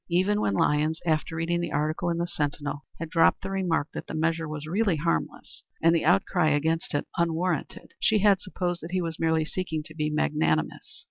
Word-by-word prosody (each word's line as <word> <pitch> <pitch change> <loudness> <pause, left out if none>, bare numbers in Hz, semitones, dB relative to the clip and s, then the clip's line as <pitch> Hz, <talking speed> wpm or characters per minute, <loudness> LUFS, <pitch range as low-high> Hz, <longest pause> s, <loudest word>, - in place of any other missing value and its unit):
Even 190 +4 +2
when 100 - +1
Lyons, 150 +7 +2
after 160 0 0
reading 170 +1 0
the 170 -2 -3
article 155 +3 0
in 170 - 0
the 170 - 0
Sentinel, 145 -3 -3
had 165 - -4
dropped 165 -2 +4
the 195 - -4
remark 175 -6 0
that - - -6
the - - -5
measure 165 0 0
was 150 -1 -5
really 195 +3 +1
harmless 165 +2 -2 0.2
and 165 +1 +4
the 165 - +1
outcry 175 -1 +3
against 160 +2 0
it 145 - 0
unwarranted, 170 -1 -1
she 220 - +3
had 200 -2 +4
supposed 175 -2 -3
that 165 - -7
he 185 - +1
was 165 -1 -4
merely 160 -1 +2
seeking 160 -3 -3
to 155 - -13
be 155 -1 -1
magnanimous. 150 - -1
165 Hz, 200 wpm, -27 LUFS, 155-175 Hz, 0.2 s, dropped